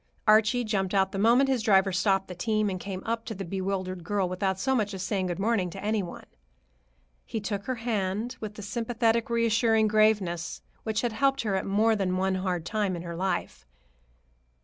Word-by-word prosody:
Archie 220 Hz, +3 st, +5 dB
jumped 200 Hz, -3 st, -1 dB
out 190 Hz, -1 st, +3 dB
the 195 Hz, -, -3 dB
moment 240 Hz, +6 st, +5 dB
his 260 Hz, -3 st, +1 dB
driver 195 Hz, -3 st, +4 dB
stopped 195 Hz, +1 st, +1 dB
the 180 Hz, -, -6 dB
team 215 Hz, +2 st, 0 dB
and 185 Hz, -, -4 dB
came 190 Hz, 0 st, -6 dB
up 225 Hz, 0 st, -1 dB
to 225 Hz, -, -6 dB
the 195 Hz, 0 st, -5 dB
bewildered 185 Hz, 0 st, -3 dB
girl 200 Hz, +1 st, 0 dB
without 190 Hz, +1 st, -1 dB
so 265 Hz, +6 st, +1 dB
much 210 Hz, -5 st, 0 dB
as 185 Hz, -, -5 dB
saying 190 Hz, -1 st, -1 dB
good 175 Hz, -, -3 dB
morning 200 Hz, -2 st, +1 dB
to 195 Hz, +3 st, -8 dB
any 215 Hz, 0 st, +1 dB
one. 175 Hz, -, -8 dB, 1.0 s
He 225 Hz, -, -4 dB
took 200 Hz, -1 st, -4 dB
her 255 Hz, -, -1 dB
hand 220 Hz, -1 st, -2 dB
with 210 Hz, -1 st, -6 dB
the 210 Hz, -, -8 dB
sympathetic, 230 Hz, +1 st, 0 dB
reassuring 230 Hz, -1 st, +3 dB
graveness 210 Hz, -6 st, +1 dB, 0.2 s
which 220 Hz, -1 st, -1 dB
had 240 Hz, -2 st, -1 dB
helped 275 Hz, +4 st, +2 dB
her 210 Hz, -3 st, -1 dB
at 190 Hz, -, -2 dB
more 220 Hz, +3 st, +3 dB
than 185 Hz, -3 st, 0 dB
one 190 Hz, 0 st, +1 dB
hard 185 Hz, -3 st, -2 dB
time 205 Hz, -2 st, -1 dB
in 170 Hz, -, -6 dB
her 170 Hz, -1 st, -6 dB
life. 175 Hz, -, -3 dB
205 Hz, 200 wpm, -27 LUFS, 190-225 Hz, 1.0 s, Archie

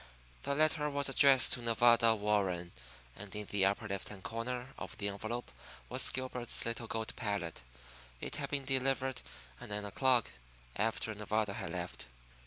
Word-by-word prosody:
The 140 Hz, -, -1 dB
letter 155 Hz, 0 st, +2 dB
was 140 Hz, -1 st, +1 dB
addressed 135 Hz, -1 st, +6 dB
to 125 Hz, -, +1 dB
Nevada 115 Hz, 0 st, +5 dB
Warren; 100 Hz, -5 st, 0 dB, 0.4 s
and 100 Hz, 0 st, -9 dB
in 105 Hz, 0 st, -3 dB
the 100 Hz, -2 st, +3 dB
upper 100 Hz, +2 st, -1 dB
left 100 Hz, -1 st, -4 dB
hand 100 Hz, -3 st, -10 dB
corner 125 Hz, +3 st, -4 dB
of -, -, -7 dB
the 100 Hz, -1 st, -2 dB
envelope 110 Hz, +4 st, -5 dB, 0.4 s
was -, -, +3 dB
Gilbert's 125 Hz, -2 st, -1 dB
little 115 Hz, 0 st, -3 dB
gold 110 Hz, 0 st, -4 dB
palette. 100 Hz, -7 st, -3 dB, 0.6 s
It -, -, -5 dB
had -, -, -3 dB
been 140 Hz, -2 st, -2 dB
delivered 130 Hz, -1 st, +1 dB, 0.4 s
at -, -, -9 dB
nine 105 Hz, 0 st, -2 dB
o'clock, 125 Hz, +3 st, +3 dB, 0.4 s
after 110 Hz, +1 st, 0 dB
Nevada 105 Hz, 0 st, -1 dB
had 95 Hz, -5 st, -5 dB
left. 90 Hz, -6 st, -4 dB
115 Hz, 160 wpm, -33 LUFS, 100-130 Hz, 0.6 s, addressed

